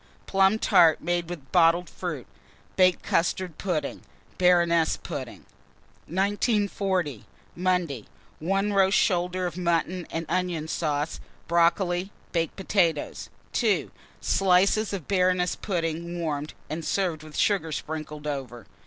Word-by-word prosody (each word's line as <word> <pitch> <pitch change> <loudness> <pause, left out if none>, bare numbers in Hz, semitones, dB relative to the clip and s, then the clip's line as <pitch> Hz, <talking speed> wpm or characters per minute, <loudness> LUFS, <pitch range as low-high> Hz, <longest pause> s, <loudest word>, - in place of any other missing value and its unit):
Plum 195 +2 +3
tart 165 -7 +5
made 175 0 -1
with 145 -7 -8
bottled 170 0 +4
fruit, 165 -9 -5 0.5
baked 185 -1 +4
custard 180 0 0
pudding, 165 -7 -2 0.4
Baroness 170 -2 +4
pudding. - - -7 0.6
1940. 195 - 0 0.3
Monday. 175 - 0 0.3
1. 195 +5 0
Roast 195 0 +4
shoulder 180 -1 +1
of 175 -1 -4
mutton 175 0 0
and 165 0 -3
onion 175 -3 -1
sauce, 150 -1 -2 0.3
brocoli, 175 +2 +2 0.2
baked 165 -2 -1
potatoes. 180 -6 0 0.2
2. - - +1 0.3
Slices 195 +3 +3
of 190 -7 -5
Baroness 180 -2 +2
pudding 170 -2 -3
warmed, 150 -2 -3
and 160 +2 -4
served 175 -3 -1
with 155 -1 -10
sugar 185 -6 +1
sprinkled 150 0 -5
over. 130 -7 -5
175 Hz, 115 wpm, -26 LUFS, 160-185 Hz, 0.6 s, tart